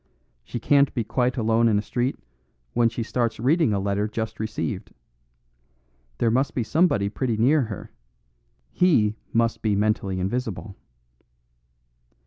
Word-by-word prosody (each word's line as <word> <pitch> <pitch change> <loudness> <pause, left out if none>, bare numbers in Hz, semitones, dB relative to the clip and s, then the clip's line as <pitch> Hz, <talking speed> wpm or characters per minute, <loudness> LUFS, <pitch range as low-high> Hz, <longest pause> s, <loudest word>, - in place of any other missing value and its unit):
She 120 - -5
can't 140 +3 +3
be 120 - 0
quite 125 +4 0
alone 115 0 +3
in 105 -2 +3
a - - +1
street 125 +4 -1 0.6
when 120 -1 +3
she 115 0 -4
starts 115 -1 -1
reading 150 +3 +3
a 100 - +1
letter 100 +1 0
just 110 0 -4
received. 110 -1 -4 1.2
There 115 - +2
must 130 +4 +1
be 120 - 0
somebody 155 - +2
pretty 115 +2 -2
near 140 +7 +4
her; 105 -3 -8 0.8
he 115 - +3 0.2
must 115 0 +1
be 105 -2 +1
mentally 100 -2 0
invisible." 105 0 -3
115 Hz, 135 wpm, -24 LUFS, 105-125 Hz, 1.2 s, near